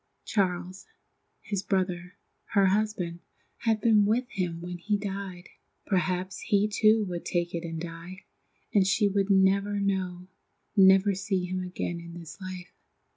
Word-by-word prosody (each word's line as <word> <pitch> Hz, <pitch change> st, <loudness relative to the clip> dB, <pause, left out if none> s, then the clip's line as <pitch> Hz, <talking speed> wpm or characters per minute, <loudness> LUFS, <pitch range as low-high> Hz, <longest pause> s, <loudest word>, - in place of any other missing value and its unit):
Charles, 185 Hz, -2 st, -1 dB, 0.5 s
his 200 Hz, -2 st, -3 dB
brother, 180 Hz, -2 st, -1 dB, 0.4 s
her 200 Hz, -1 st, +6 dB
husband, 190 Hz, -4 st, 0 dB, 0.4 s
had 225 Hz, -2 st, +1 dB
been 215 Hz, -2 st, +5 dB
with 240 Hz, +4 st, +1 dB
him 180 Hz, -4 st, -2 dB
when 175 Hz, +1 st, -6 dB
he 205 Hz, +4 st, 0 dB
died. 195 Hz, -3 st, -6 dB, 0.4 s
Perhaps 185 Hz, -1 st, -1 dB
he 205 Hz, 0 st, +2 dB
too 215 Hz, 0 st, +3 dB
would 175 Hz, -2 st, -5 dB
take 175 Hz, -1 st, -1 dB
it 170 Hz, 0 st, -3 dB
and 165 Hz, -1 st, -4 dB
die, 170 Hz, +2 st, -8 dB, 0.5 s
and 195 Hz, -3 st, +4 dB
she 205 Hz, +2 st, +3 dB
would 200 Hz, 0 st, 0 dB
never 200 Hz, +1 st, +3 dB
know, 185 Hz, -2 st, -1 dB, 0.5 s
never 195 Hz, +1 st, +6 dB
see 190 Hz, -1 st, -1 dB
him 185 Hz, +1 st, -3 dB
again 180 Hz, -1 st, -4 dB
in 170 Hz, 0 st, -10 dB
this 170 Hz, +4 st, -11 dB
life. 185 Hz, -2 st, -7 dB
190 Hz, 145 wpm, -28 LUFS, 180-200 Hz, 0.5 s, her